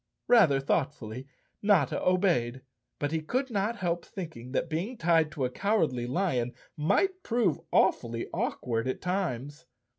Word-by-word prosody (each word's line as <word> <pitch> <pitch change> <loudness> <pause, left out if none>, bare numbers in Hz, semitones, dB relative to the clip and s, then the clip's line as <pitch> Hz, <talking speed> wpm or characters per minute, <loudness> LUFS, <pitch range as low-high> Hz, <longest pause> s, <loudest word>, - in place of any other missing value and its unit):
Rather 190 - +6
thoughtfully 135 -4 -2 0.3
Notta 200 -10 +3
obeyed, 165 -10 +2 0.3
but 145 0 -2
he 160 0 0
could 255 - -2
not 210 +2 0
help 175 -4 -1
thinking 155 - -8
that 155 - 0
being 175 +10 -3
tied 165 -3 +3
to 135 - -1
a 125 - -2
Cowardly 155 - 0
Lion 125 -5 0 0.2
might 370 - +1
prove 225 - +1
awfully 115 -1 +2
awkward 115 0 -1
at 130 - -2
times. 165 -5 -3
160 Hz, 140 wpm, -29 LUFS, 130-195 Hz, 0.3 s, Rather